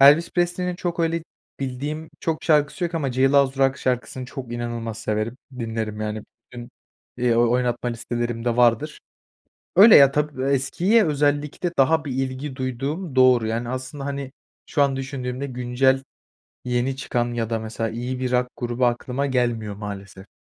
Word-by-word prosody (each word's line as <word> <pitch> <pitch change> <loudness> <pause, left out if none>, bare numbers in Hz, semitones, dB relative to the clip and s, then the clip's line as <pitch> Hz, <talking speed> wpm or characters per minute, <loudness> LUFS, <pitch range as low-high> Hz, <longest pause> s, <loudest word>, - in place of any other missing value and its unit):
Elvis 145 +5 +7
Presley'nin 175 0 0
çok 175 -1 -3
öyle 165 0 0 0.4
bildiğim 145 +4 -4
çok 160 -1 -2
şarkısı 150 +2 +2
yok 170 - -3
ama 140 -6 -1
Jailhouse 135 +1 +3
Rock 135 +1 +1
şarkısını 125 0 -2
çok 125 -2 -7
inanılmaz 120 -2 -4
severim, 110 +3 -2 0.2
dinlerim 110 -2 -3
yani 110 0 -3 0.3
bütün, 120 -1 -9 0.5
eee, 120 -1 +2
oynatma 120 +1 +1
listelerimde 120 0 -2
vardır. 120 +5 +2 0.8
Öyle 210 +3 +10
ya, 140 -1 +8
tabii, 150 -3 -1
eskiye 140 - +2
özellikle 145 +3 0
daha 155 +4 +4
bir 140 - -4
ilgi 130 +1 -3
duyduğum 135 +5 -3
doğru, 125 -3 +5
yani, 115 +2 -2
aslında, 130 +2 -5
hani, 140 -1 -4 0.3
şu 145 - +1
an 135 -1 +2
düşündüğümde 135 0 -4
güncel 130 +1 +1 0.6
yeni 125 +2 0
çıkan 120 -3 -2
ya 115 -1 -2
da, 115 - 0
mesela, 110 0 -3
iyi 125 +3 -4
bir 125 -1 -1
rock 125 0 +2
grubu 120 +1 0
aklıma 125 +3 -1
gelmiyor 120 -5 0
maalesef. 100 -2 -8
130 Hz, 150 wpm, -23 LUFS, 120-140 Hz, 0.8 s, Öyle